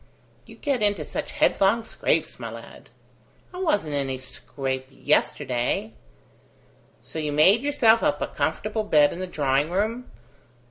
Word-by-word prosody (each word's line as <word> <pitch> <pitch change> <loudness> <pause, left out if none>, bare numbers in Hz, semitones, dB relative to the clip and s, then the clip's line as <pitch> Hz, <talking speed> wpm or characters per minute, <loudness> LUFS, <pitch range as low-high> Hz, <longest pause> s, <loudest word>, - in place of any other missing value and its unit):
"You - - -13
get 275 -6 -1
into 205 -1 +1
such - - -5
headlong 205 +4 +2
scrapes, - - -1
my - - -5
lad." - - -12 0.6
"I 360 - -7
wasn't 205 - 0
in 145 - 0
any 135 -1 -2
scrape 130 +1 -5
yesterday." 125 -5 0 1.1
"So 160 - -7
you 150 -1 -2
made 185 +10 +5
yourself 245 -6 +4
up 145 - +1
a - - -1
comfortable 210 +9 -2
bed 150 -8 +4
in 170 - -7
the 185 - -4
drawing 145 -3 0
room? 220 +7 -2
160 Hz, 145 wpm, -24 LUFS, 140-220 Hz, 1.1 s, made